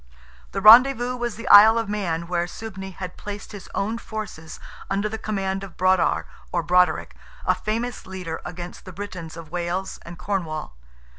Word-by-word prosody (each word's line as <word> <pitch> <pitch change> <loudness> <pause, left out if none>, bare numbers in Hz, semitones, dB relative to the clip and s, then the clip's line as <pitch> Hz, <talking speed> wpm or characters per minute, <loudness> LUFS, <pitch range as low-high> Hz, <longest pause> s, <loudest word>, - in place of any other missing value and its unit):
The 195 - -3
rendezvous 245 +3 +7
was 240 -2 -3
the 230 - -8
Isle 220 +3 +9
of 225 -2 -1
Man, 180 -5 -2
where 175 0 -1
Suibne 190 -1 -8
had 185 0 -7
placed 205 0 -7
his 205 -3 -10
own 220 +3 -1
forces 200 -9 -7 0.3
under 200 +2 0
the 220 +1 -5
command 195 -2 -2
of 195 -3 -10
Brodar 185 0 +2 0.3
or 170 - 0
Broderick, 180 +1 +2 0.3
a - - +4
famous 230 +2 -3
leader 180 -4 -6
against 175 0 -8
the 185 - -9
Britons 180 -4 -7
of 160 -2 -10
Wales 175 +2 -3
and 170 0 -10
Cornwall. 170 - -3
195 Hz, 165 wpm, -24 LUFS, 175-215 Hz, 0.3 s, Isle